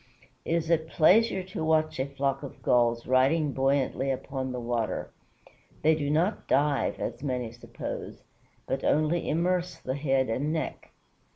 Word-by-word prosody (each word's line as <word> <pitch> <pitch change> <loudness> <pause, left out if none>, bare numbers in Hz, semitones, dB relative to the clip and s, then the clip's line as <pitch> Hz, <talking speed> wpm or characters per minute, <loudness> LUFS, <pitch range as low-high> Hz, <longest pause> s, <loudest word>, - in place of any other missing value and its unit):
It 165 - +1
is 165 0 -1
a 165 - +5
pleasure 185 +6 +3
to 185 -3 -5
watch 155 -2 +1
a 130 - 0
flock 140 0 -1
of 140 - -10
Gulls 120 -1 +2
riding 140 +4 +3
buoyantly 135 0 +1
upon 130 0 -3
the 125 - -4
water. 120 -2 -2 0.7
They 160 +1 +5
do 145 -2 -1
not 170 +8 0
dive, 140 +1 +1
as - - -4
many 125 -5 -2
suppose, 120 +1 -7 0.4
but - - -2
only 155 +3 +1
immerse 180 +3 0
the 130 - -4
head 135 -2 +1
and 135 +7 -1
neck. 160 -1 -4
140 Hz, 155 wpm, -28 LUFS, 130-160 Hz, 0.7 s, a